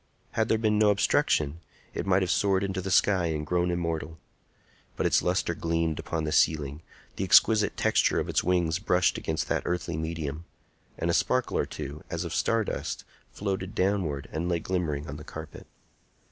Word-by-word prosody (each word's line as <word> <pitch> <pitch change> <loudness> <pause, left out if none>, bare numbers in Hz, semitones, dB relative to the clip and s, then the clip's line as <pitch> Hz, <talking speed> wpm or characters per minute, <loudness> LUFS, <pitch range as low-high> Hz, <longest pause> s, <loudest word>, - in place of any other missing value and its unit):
Had 110 0 0
there 110 - +3
been 110 -1 +1
no 105 -1 +5
obstruction, 80 -6 +2 0.3
it - - -4
might 95 0 +3
have 90 - 0
soared 100 -1 +2
into 95 -1 -2
the 95 - -4
sky 95 -1 +3
and 75 -2 -2
grown 90 +2 +1
immortal. 85 -2 -2 0.8
But - - 0
its - - +4
lustre 90 -1 0
gleamed 80 -1 -1
upon 80 -1 -3
the 75 - -2
ceiling; 75 -1 +2 0.4
the - - -1
exquisite 105 +3 +5
texture - - +2
of - - -2
its - - +1
wings 85 -2 +1
brushed 90 -2 +2
against 80 0 -2
that - - +1
earthly 85 -2 -2
medium; 80 -1 -4 0.5
and 85 +1 0
a - - 0
sparkle 125 +8 +1
or - - 0
two, 75 +3 -7
as 85 +1 -3
of 85 -1 -5
stardust, 115 -2 -1 0.3
floated 95 -1 -4
downward 90 -8 0
and 80 +3 -2
lay 85 - +2
glimmering 80 -5 -2
on 70 - -6
the 75 - -9
carpet. 80 -2 -9
85 Hz, 180 wpm, -28 LUFS, 80-95 Hz, 0.8 s, no